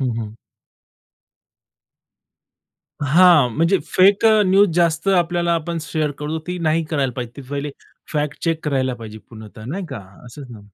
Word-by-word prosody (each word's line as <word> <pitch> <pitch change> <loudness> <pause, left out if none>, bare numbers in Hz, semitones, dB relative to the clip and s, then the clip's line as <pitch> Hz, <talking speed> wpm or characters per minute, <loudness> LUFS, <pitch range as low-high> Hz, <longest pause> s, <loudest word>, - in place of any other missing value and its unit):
हं, 130 -3 0
हं. 105 -1 -7 2.7
हां. 150 -1 +5
म्हणजे 170 +4 +2
फेक 195 +3 +3
अ, 215 -1 +5
न्यूज 195 +2 +4
जास्त 170 +1 +1
आपल्याला 175 -2 +1
आपण 165 +1 -3
शेअर 155 -1 -2
करतो 150 +2 -3
ती 180 0 -4
नाही 165 0 0
करायला 135 -5 0
पाहिजे. 120 -2 -5
ते 140 - -8
पहिले 145 0 -3 0.4
फॅक्ट 150 -1 -3
चेक 165 -1 -1
करायला 130 -4 0
पाहिजे 110 -2 -10
पूर्णतः, 110 -1 -12
नाही 180 - -5
का, 135 -7 -7 0.3
असंच 130 +3 -11
ना? 110 -3 -11
155 Hz, 150 wpm, -20 LUFS, 130-175 Hz, 2.7 s, हां